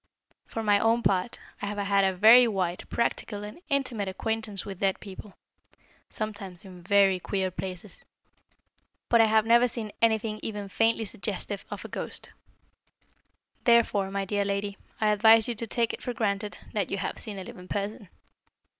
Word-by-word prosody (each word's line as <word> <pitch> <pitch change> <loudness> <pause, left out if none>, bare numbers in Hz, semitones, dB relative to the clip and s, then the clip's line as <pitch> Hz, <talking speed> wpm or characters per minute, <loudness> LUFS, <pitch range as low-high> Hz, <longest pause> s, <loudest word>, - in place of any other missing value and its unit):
For 225 - -4
my 205 -1 +4
own 230 +2 +2
part, 190 +4 +1 0.2
I 205 - -2
have 205 0 -4
had 200 -1 +2
a 190 -1 +1
very 230 +6 +8
wide, 185 -5 -2
practical, 210 -3 -2
and 210 +11 -9
intimate 255 -8 -1
acquaintance 215 0 -3
with 195 -3 -7
dead 195 -1 +1
people 195 0 -10 0.7
sometimes 200 -3 -4
in 180 -2 -11
very 195 0 +4
queer 190 0 -2
places 185 +1 -7 1.1
but 235 -1 +6
I - - +6
have 220 0 +3
never 235 +2 +5
seen 225 -3 -4
anything 220 -1 +1
even 205 -2 -5
faintly 225 +2 +1
suggestive 200 0 -3
of - - -7
a - - -4
ghost. - - -5 1.3
Therefore, 230 -5 +3
my 195 0 -2
dear 205 +1 0
lady, 200 0 -2 0.2
I 215 - +2
advise 220 +1 +6
you 240 - -1
to 230 +1 -6
take 230 0 +1
it - - -7
for 245 - -3
granted 205 -2 -2 0.2
that 205 -4 -1
you 195 - -2
have - - -4
seen 210 -3 -5
a 190 - -5
living 180 0 -11
person." 205 0 -4
205 Hz, 170 wpm, -27 LUFS, 195-225 Hz, 1.3 s, very